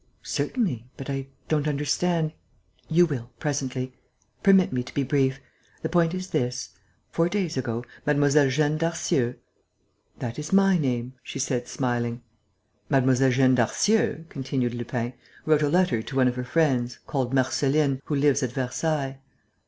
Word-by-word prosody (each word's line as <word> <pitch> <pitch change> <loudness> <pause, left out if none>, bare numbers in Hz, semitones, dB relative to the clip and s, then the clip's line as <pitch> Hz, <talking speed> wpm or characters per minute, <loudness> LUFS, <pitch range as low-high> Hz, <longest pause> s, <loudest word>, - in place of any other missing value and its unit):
"Certainly, 170 - -1
but 135 +1 -5
I 135 0 -3 0.2
don't 150 -1 +1
understand...." 155 +3 0 0.6
"You 175 +2 +5
will, 125 -7 -4
presently. 130 -3 -2 0.5
Permit 190 -6 +5
me 125 - 0
to 125 - -9
be 140 - +1
brief. 135 -1 +1 0.4
The - - -1
point 170 0 +2
is 185 0 -6
this: 125 +1 -1 0.4
four 165 +1 +2
days 190 -4 -1
ago, 120 -2 -2 0.2
Mlle. 145 -1 +4
Jeanne 150 +3 +1
Darcieux...." 155 -7 0 0.8
"That 120 +3 -5
is 150 +1 -6
my 195 -2 +5
name," 125 -3 -1
she - - -7
said, 125 -2 -1
smiling. 120 -2 -2 0.7
"Mlle. 130 -1 +4
Jeanne 130 0 +4
Darcieux," 185 - +2
continued 130 -4 -2
Lupin, 120 0 -3 0.3
"wrote 155 -1 +4
a 145 - +2
letter 175 -8 +2
to 135 - -8
one 130 -1 +4
of 125 - 0
her 125 - -3
friends, 125 -5 +1
called 130 -3 -1
Marceline, 135 +1 +2
who 150 - -1
lives 145 0 +3
at 125 -2 -2
Versailles...." 135 +1 -2
135 Hz, 150 wpm, -26 LUFS, 125-155 Hz, 0.8 s, You